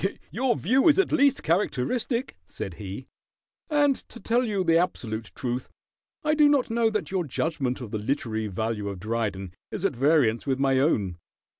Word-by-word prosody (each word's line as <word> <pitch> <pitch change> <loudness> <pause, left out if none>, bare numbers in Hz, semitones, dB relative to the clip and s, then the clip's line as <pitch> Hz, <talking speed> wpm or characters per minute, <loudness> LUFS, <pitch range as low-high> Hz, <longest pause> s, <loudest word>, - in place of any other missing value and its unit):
"Your 250 +1 +1
view 265 +7 +2
is 310 - +6
at 385 - +2
least 280 -3 +3
characteristic," 210 - 0
said 95 - -6
he, 100 +6 -6 0.6
"and 290 -2 +3
to 235 - -11
tell 240 +2 +1
you 205 -5 0
the 165 -2 +3
absolute 115 -10 -1
truth, 125 0 -3 0.5
I 305 0 +2
do 300 -1 +5
not 275 -5 +2
know 230 -1 +3
that 215 -3 -3
your 190 -2 0
judgment 135 -3 -2
of 115 -4 -7
the 110 - -2
literary 110 -2 -2
value 105 +1 -2
of 100 -2 -6
Dryden 100 -3 -3 0.2
is 195 - -4
at 140 - +1
variance 135 -3 +2
with 135 -1 +1
my 135 -1 +2
own. 100 - +1
140 Hz, 175 wpm, -26 LUFS, -, 0.6 s, is